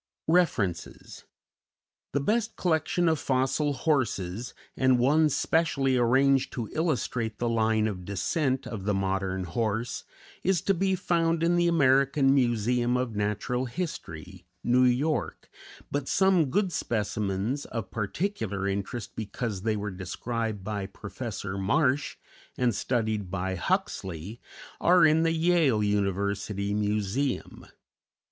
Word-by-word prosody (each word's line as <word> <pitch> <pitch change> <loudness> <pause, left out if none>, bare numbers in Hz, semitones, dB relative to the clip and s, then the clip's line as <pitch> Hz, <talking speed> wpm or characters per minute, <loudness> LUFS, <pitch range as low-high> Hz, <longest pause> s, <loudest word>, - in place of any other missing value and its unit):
REFERENCES 125 - 0 0.9
_The 140 -1 0
best 225 0 0
collection 170 0 +1
of 160 -2 +2
fossil 135 +3 +1
horses, 120 - -1 0.2
and 130 -1 +3
one 150 +6 +4
specially 140 -3 +1
arranged 130 +2 +3
to 115 -3 -3
illustrate 125 - -1
the 120 - -1
line 110 -1 +2
of 95 -4 -3
descent 130 - -1
of 100 -4 -6
the 105 -1 +1
modern 95 -1 -1
horse, 110 +5 -2 0.4
is 190 -1 +2
to 195 - +2
be 190 +1 +1
found 165 -2 +1
in 170 +1 +3
the 175 0 +3
American 135 -3 +4
Museum 120 -1 +2
of 125 -3 -2
Natural 105 +5 -1
History, 95 - -6 0.2
New 125 +1 +4
York, 135 +6 0 0.4
but 140 -1 -2
some 190 -6 +3
good 195 +6 +1
specimens, 105 +2 -2
of 110 -6 -5
particular 105 - -2
interest 100 +2 -4
because 110 -2 -4
they 110 +1 0
were 105 0 -3
described 105 +3 -4
by 100 -1 -3
Professor 100 -3 -6
Marsh 135 +7 +1 0.4
and 125 -2 +2
studied 110 -4 -1
by 95 0 -2
Huxley 95 +3 -3 0.4
are 175 -1 +5
in 155 +1 +4
the 165 0 +2
Yale 160 -9 +3
University 100 0 -1
Museum. 105 +5 -2
120 Hz, 125 wpm, -27 LUFS, 100-145 Hz, 0.9 s, are